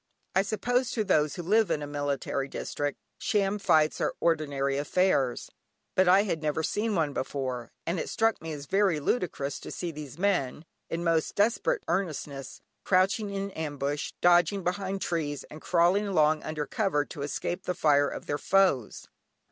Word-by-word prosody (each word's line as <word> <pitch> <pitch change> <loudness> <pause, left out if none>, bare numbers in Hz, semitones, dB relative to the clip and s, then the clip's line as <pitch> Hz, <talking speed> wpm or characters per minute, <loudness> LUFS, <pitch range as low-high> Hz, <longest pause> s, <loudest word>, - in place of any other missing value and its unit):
I 190 - +4
suppose 245 +5 0
to 220 - 0
those 155 -7 +2
who 175 - -5
live 215 +4 +3
in 150 - 0
a - - -3
military 145 -1 -2
district, 145 +1 -3 0.2
sham 205 -1 +1
fights 155 -5 +3
are - - 0
ordinary 140 -4 0
affairs, 145 -5 +1 0.4
but 185 0 +3
I 190 +3 +6
had 170 -6 -2
never 155 +1 -1
seen 215 +5 0
one 155 -4 +1
before, 130 -3 -3
and 170 +1 -1
it - - -3
struck 225 0 +1
me 160 0 -5
as 145 -2 -6
very 195 -2 +2
ludicrous 145 - -1
to - - -9
see 175 - -4
these 150 -2 -9
men, 170 -6 0 0.2
in 170 +1 -3
most 165 -2 +1
desperate 235 - +1
earnestness, 150 -7 -3 0.2
crouching 195 +3 +2
in 200 0 -3
ambush, 145 -3 -3
dodging 175 +3 +4
behind 190 +2 -2
trees, 150 -4 -2
and 155 - -10
crawling 180 +4 +3
along 155 -4 +3
under 155 -1 -3
cover 150 -4 0
to 145 - -8
escape 175 +5 -3
the 180 - -1
fire 145 -4 +3
of - - -7
their 145 0 -2
foes. 185 - +2
165 Hz, 170 wpm, -28 LUFS, 145-195 Hz, 0.4 s, I